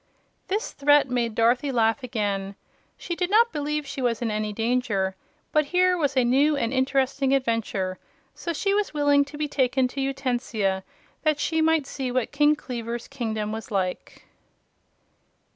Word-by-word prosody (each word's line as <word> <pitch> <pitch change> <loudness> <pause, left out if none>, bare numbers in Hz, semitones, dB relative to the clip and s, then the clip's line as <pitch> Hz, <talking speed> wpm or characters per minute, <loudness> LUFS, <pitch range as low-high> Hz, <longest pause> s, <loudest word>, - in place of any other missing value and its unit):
This 415 +4 -2
threat 290 -1 +3
made 235 -3 0
Dorothy 245 +5 +2
laugh 225 +1 +2
again. 205 -5 -2 0.4
She 345 - -4
did 355 0 -1
not 460 +3 +4
believe 300 0 -2
she 275 -1 -5
was 240 -3 0
in 235 -2 -1
any 215 0 -2
danger; 225 -4 0 0.4
but 305 -1 +3
here 365 +3 +3
was 285 -5 -1
a 255 - +5
new 280 +5 +3
and 230 -2 -1
interesting 270 +1 +1
adventure, 220 -7 -1 0.3
so 340 - -4
she 395 +5 0
was 410 -6 0
willing 290 -1 +4
to 290 +1 -10
be 300 0 -1
taken 260 -2 +1
to 275 - -4
Utensia 245 -8 -1 0.4
that 305 -2 +1
she 320 +1 0
might 320 -2 +3
see 265 -2 -4
what 250 -2 -1
King 295 +1 +4
Kleaver's 235 -3 -5
kingdom 220 -3 -3
was 220 +1 -6
like. 185 -3 -3
260 Hz, 160 wpm, -25 LUFS, 230-295 Hz, 0.4 s, a